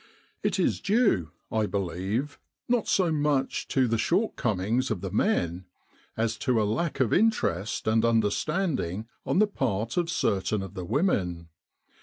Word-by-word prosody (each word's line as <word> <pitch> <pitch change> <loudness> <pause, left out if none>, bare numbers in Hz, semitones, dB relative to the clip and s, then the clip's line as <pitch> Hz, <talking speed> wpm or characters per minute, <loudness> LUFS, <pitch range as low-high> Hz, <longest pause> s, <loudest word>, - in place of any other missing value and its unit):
It - - 0
is - - +1
due, 200 - +2 0.2
I 110 -1 +1
believe, 100 - -2 0.3
not 240 -2 +1
so 180 -4 +2
much 145 -3 0
to 130 -2 +2
the 115 -1 0
shortcomings 120 - 0
of 105 -6 -2
the 95 -2 -4
men, 90 - 0 0.5
as 110 0 0
to 125 -2 +1
a - - +2
lack 120 +11 -1
of 130 -5 +2
interest 145 - +1
and 110 +1 +3
understanding 115 - 0 0.2
on - - +1
the 215 - +6
part 115 - -2
of 175 -2 +1
certain 100 - 0
of 95 - -8
the 90 -3 -5
women. 90 - 0
115 Hz, 150 wpm, -27 LUFS, 100-155 Hz, 0.5 s, the